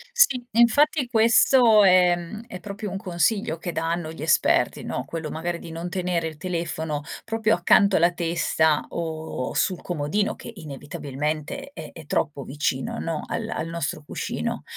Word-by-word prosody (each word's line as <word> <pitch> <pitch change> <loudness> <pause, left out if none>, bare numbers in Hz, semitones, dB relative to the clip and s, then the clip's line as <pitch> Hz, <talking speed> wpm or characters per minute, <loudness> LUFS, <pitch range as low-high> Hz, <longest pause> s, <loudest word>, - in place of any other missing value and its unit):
Sì. 365 - +4
Infatti, 260 +5 +4
questo 230 -1 +5
è, 180 -1 +6
mhmm, 175 +5 -7
è 180 - -8
proprio 205 0 -6
un 195 - -3
consiglio 185 -2 0
che 175 +2 -5
danno 165 0 -2
gli 160 - -10
esperti, 160 0 +2
no, - - -4
quello 160 -2 -5
magari 170 +2 -3
di 165 - -10
non 165 +2 -5
tenere 175 -2 -1
il 155 - -7
telefono 160 -3 -3 0.2
proprio 225 -1 +1
accanto 195 +3 +4
alla 170 +2 +4
testa 165 -2 +1
o 160 -5 -4
sul 185 -3 0
comodino 175 +5 -1
che - - -9
inevitabilmente 150 - -5
è - - -9
è 160 - -11
troppo 145 -1 -1
vicino, 135 -1 -2
no, 165 -2 -3
al - - -3
al 165 - -3
nostro 160 -2 -3
cuscino. - - -4
170 Hz, 160 wpm, -24 LUFS, 160-205 Hz, 0.2 s, è